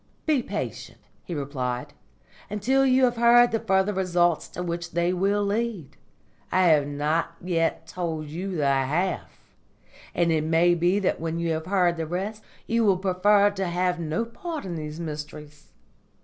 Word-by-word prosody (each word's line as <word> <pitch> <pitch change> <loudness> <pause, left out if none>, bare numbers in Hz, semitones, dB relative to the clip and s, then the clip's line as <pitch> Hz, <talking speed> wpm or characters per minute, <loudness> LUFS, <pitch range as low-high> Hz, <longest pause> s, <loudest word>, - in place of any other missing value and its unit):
"Be 300 -5 +2
patient," - - -5 0.3
he 175 - -5
replied, 135 -1 -4 0.6
"until 235 +7 +1
you 260 0 +4
have 245 -1 0
heard 240 +1 +6
the 225 - 0
further 190 +1 +1
results 175 -3 +1
to 180 - -6
which 170 -1 -4
they 170 +1 +1
will 200 +3 +1
lead. 205 - -2 0.6
I 185 - +3
have 150 -3 +4
not 150 +3 -1
yet 165 -2 -1
told 165 -4 -4
you 180 +6 -5
the 150 - 0
half, 140 - -1 0.6
and 170 -1 +2
it 155 -1 +1
may 165 +2 +3
be 175 +3 +2
that 200 - 0
when 165 0 -3
you 170 0 -1
have 160 +1 -3
heard 180 -3 +2
the 160 -1 -3
rest 195 +6 -4 0.2
you 230 0 +1
will 195 -4 +4
prefer 200 +2 +3
to 195 -2 -3
have 180 0 0
no 170 +8 -2
part 320 - -6
in 180 - -4
these 155 -1 -6
Mysteries. 150 -2 -8
175 Hz, 165 wpm, -25 LUFS, 160-200 Hz, 0.6 s, heard